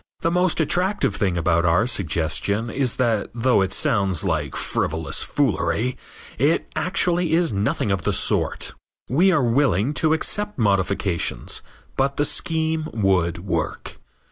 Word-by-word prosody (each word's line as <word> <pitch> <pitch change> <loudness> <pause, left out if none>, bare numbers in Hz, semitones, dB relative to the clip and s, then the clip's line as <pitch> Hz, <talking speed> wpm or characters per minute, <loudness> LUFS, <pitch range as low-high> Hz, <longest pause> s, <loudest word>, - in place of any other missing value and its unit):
The 165 - +1
most 180 -1 +1
attractive 185 +6 +1
thing 95 -5 0
about 85 0 +1
our 90 +5 +3
suggestion 100 +2 -1
is 130 -1 -1
that 115 -5 0
though 120 -2 +2
it 95 0 0
sounds 100 - +1
like - - -2
frivolous 80 +1 -1
foolery 125 +4 0 0.4
it 145 +6 +2
actually 180 -2 0
is 165 -6 +2
nothing 100 0 -1
of 95 -2 0
the - - 0
sort. - - 0 0.4
We 175 +9 +4
are 155 -7 +2
willing 120 - +2
to 160 -1 +3
accept 205 +6 0
modifications, 95 - 0 0.4
but 135 +1 0
the 145 - +2
scheme 160 0 0
would 95 -4 0
work. 85 -4 -3
115 Hz, 140 wpm, -22 LUFS, 95-160 Hz, 0.4 s, We